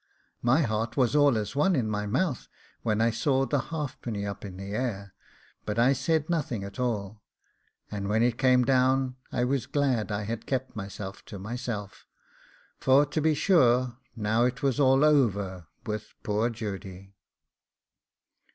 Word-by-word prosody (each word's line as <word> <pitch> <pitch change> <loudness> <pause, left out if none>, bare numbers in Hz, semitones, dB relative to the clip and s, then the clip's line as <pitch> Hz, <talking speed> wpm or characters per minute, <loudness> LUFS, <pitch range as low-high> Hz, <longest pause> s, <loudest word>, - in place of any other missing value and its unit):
My 130 +7 +3
heart 110 -1 -2
was 125 -1 +2
all 145 -5 +5
as 105 +4 -3
one 175 +6 +3
as 130 - +2
in 110 - -3
my 105 -1 -2
mouth 130 - -1 0.3
when 110 -1 0
I 115 +1 +3
saw 135 +3 +1
the 145 +1 0
halfpenny 130 -9 -4
up 100 -1 -6
in 95 -3 -8
the 95 +1 -7
air, 105 -5 -3 0.5
but 105 0 -3
I 120 +4 +5
said 150 +3 0
nothing 145 - -1
at 100 +5 -8
all; 105 -4 -2 0.7
and 100 -1 -3
when 110 +2 +3
it 120 0 +1
came 130 -2 +4
down 130 0 +2
I 125 - 0
was 130 0 0
glad 130 -7 0
I 105 0 -2
had 115 +2 -5
kept 130 -1 -2
myself 100 -1 -7
to 100 - -8
myself, 110 -1 -6 0.7
for 135 +2 +5
to 150 +2 -2
be 155 0 +3
sure 130 - +3 0.2
now 110 +1 +1
it 125 +3 -2
was 135 -1 +1
all 135 +1 +5
over 100 - +1 0.2
with 110 -2 -5
poor 105 +3 +1
Judy. 100 -4 -7
120 Hz, 165 wpm, -28 LUFS, 105-135 Hz, 0.7 s, all